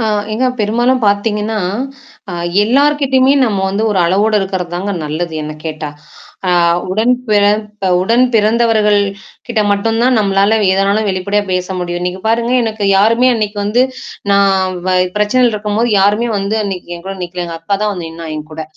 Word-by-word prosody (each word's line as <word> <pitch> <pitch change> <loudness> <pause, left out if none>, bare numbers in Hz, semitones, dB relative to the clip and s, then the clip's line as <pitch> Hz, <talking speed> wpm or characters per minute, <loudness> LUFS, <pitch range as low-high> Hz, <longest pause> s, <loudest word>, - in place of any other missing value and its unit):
ஆ 225 - 0 0.3
ஏங்க 255 +4 0
பெரும்பாலும் 240 +5 +1
பாத்தீங்கன்னா, 210 +1 0 0.7
அ - - -6 0.3
எல்லார்கிட்டயுமே 270 +2 +3
நம்ம 205 -4 -1
வந்து 200 +3 -1
ஒரு 195 - 0
அளவோடு 205 +5 +2
இருக்கிறது 190 -3 -3
தாங்க 195 +3 -2
நல்லது 160 +2 -3
என்ன 155 0 -5
கேட்டா. 155 -1 -4 0.6
அ - - +3 0.4
உடன் 220 +6 +2 0.2
பிறத்த 210 -1 +1
உடன் 230 +6 +3
பிறந்தவர்கள் 215 -1 +3 0.5
கிட்ட 235 -3 -1
மட்டும் 225 +3 0
தான் 255 0 +3
நம்மளால 200 +1 +2 0.2
எதனாலும் 200 +3 +1
வெளிப்படையா 200 +2 -1
பேச 180 0 -1
முடியும். 175 0 -3
நீங்க 180 +1 -4
பாருங்க 230 +2 +1
எனக்கு 220 -2 -3
யாருமே 230 +5 +4
அன்னைக்கு 210 -2 -2
வந்து 220 +5 +2 0.5
நான் 195 -2 +2
வ - - +1 0.3
பிரச்சனைல 235 +3 +2
இருக்கும்போது, 210 +3 -1
யாருமே 210 +4 +2
வந்து 200 +2 -2
அன்னைக்கு 185 -3 -5
என் 170 - -13
கூட 195 - -4
நிக்கலங்க, 175 -1 -5
அக்கா 180 +5 -1
தான் 210 -1 0
வந்து 175 -4 -6
நின்னா 165 0 -9
என் 155 0 -8
கூட. 160 +1 -5
205 Hz, 160 wpm, -15 LUFS, 185-225 Hz, 0.7 s, யாருமே